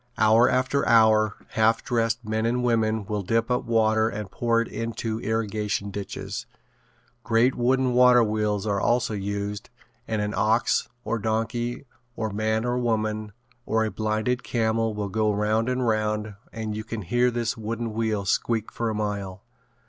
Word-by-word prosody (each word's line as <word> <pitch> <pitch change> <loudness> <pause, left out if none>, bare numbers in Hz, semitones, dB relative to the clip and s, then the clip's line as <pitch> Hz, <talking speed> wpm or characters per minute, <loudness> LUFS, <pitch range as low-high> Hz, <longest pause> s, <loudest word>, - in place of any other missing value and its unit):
Hour 110 +3 +5
after 130 +2 +1
hour 110 -2 +5
half 110 +1 +2
dressed 115 -1 0
men 110 +1 0
and 125 +1 0
women 110 -3 +1
will 105 0 -2
dip 115 +5 0
up 125 - 0
water 110 -1 +2
and 105 -3 -6
pour 115 +3 +1
it 115 - -1
into 115 -1 -4
irrigation 105 -2 -2
ditches. 100 +3 -6 0.8
Great 115 +3 +3
wooden 130 +1 +1
waterwheels 110 -5 +4
are 100 -2 0
also 120 -1 +1
used 100 +1 -4 0.4
and 110 -1 -1
an 105 0 -2
ox 110 +2 +2
or 115 +2 -2
donkey 115 +3 -2 0.3
or 110 -2 -3
man 110 +2 0
or 125 0 0
woman 110 -2 -1 0.4
or 110 0 +2
a 110 - -3
blinded 110 +3 -1
camel 115 -1 0
will 105 -1 -2
go 110 +1 +1
round 110 +3 +1
and 125 0 0
round 110 -1 0 0.2
and 110 -2 -4
you 110 - -4
can 110 -1 -5
hear 120 +7 +2
this 120 -1 -2
wooden 115 0 -4
wheel 110 -2 -1
squeak 110 +2 0
for 115 -1 -2
a 110 - -2
mile. 100 -3 -3
110 Hz, 160 wpm, -25 LUFS, 105-115 Hz, 0.8 s, Hour